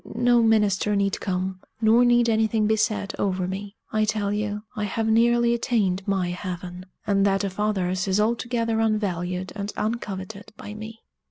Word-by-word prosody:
No 240 0 +4
minister 210 -2 +2
need 200 -1 0
come; 185 0 -2 0.2
nor 225 +2 +5
need 240 -1 +4
anything 220 -1 +2
be 220 +1 +3
said 210 -2 -1
over 185 -2 0
me. 200 +2 -6 0.2
I 215 0 +1
tell 210 -1 0
you, 210 0 -2
I 210 - -2
have 220 +2 -2
nearly 235 +1 +4
attained 205 -5 0
my 190 -3 0
heaven; 180 0 -6 0.2
and 200 -2 +2
that 195 0 +2
of 195 0 -4
others 190 -3 0
is 190 +1 +2
altogether 230 0 0
unvalued 185 -4 -1
and 205 0 -4
uncoveted 205 -3 -4
by 210 - -8
me!" 220 +1 -9
210 Hz, 165 wpm, -24 LUFS, 190-225 Hz, 0.2 s, nor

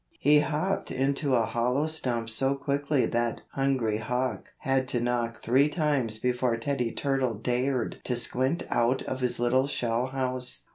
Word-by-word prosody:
He 150 +1 +5
hopped 155 +6 -1
into 135 +1 0
a 115 -2 +3
hollow 125 +6 0
stump 125 -7 -1
so 135 +4 +1
quickly 140 0 0
that 120 0 -1
Hungry 130 -6 0
Hawk 125 +2 -2
had 135 -1 +1
to 125 - -1
knock 120 -1 -1
three 135 +5 +4
times 145 -9 0
before 125 0 0
Teddy 125 -1 -1
Turtle 135 -4 0
dared 125 +3 -1
to 125 - 0
squint 130 +7 0
out 120 +3 +2
of 130 - -4
his 125 -2 -1
little 130 +3 +2
shell 120 -2 0
house. 130 -1 -1
130 Hz, 155 wpm, -28 LUFS, 120-140 Hz, -, He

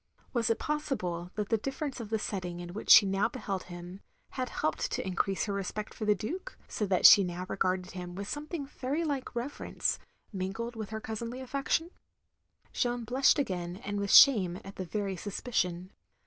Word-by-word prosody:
Was 235 -3 +1
it 230 - +2
possible 185 - -2
that 210 -2 -2
the 225 - +2
difference 270 +3 -4
of 225 -3 -6
the 220 - +1
setting 180 -4 -4
in 175 0 -7
which 215 - -7
she 205 - +10
now 195 +3 +1
beheld 205 -6 -4
him, 175 +1 -9 0.3
had 255 -2 -3
helped 155 - -1
to - - -2
in 190 - -3
crease 195 +2 0
her 205 - -2
respect 200 +2 -4
for 215 - -5
the 210 0 +4
Duke, 350 - -5
so 210 - -2
that 185 -1 +2
she 200 - +10
now 180 0 -4
regarded 185 -1 -1
him 180 -1 -7
with 200 +1 -5
something 295 +2 -4
very 275 +3 -3
like 280 -5 -3
reverence, 245 +5 -2 0.3
mingled 195 +5 -3
with 220 -2 -5
her 220 0 -4
cousinly 230 +3 -5
affection? 275 +6 -1 0.8
Jeanne 245 -1 0
blushed 255 +6 +4
again, 180 -9 -2
and 205 0 -2
with 200 0 -2
shame, 190 -11 +7
at 195 0 -10
the 185 - -3
very 200 +1 -2
suspicion. 185 -3 -2
210 Hz, 190 wpm, -30 LUFS, 185-255 Hz, 0.8 s, she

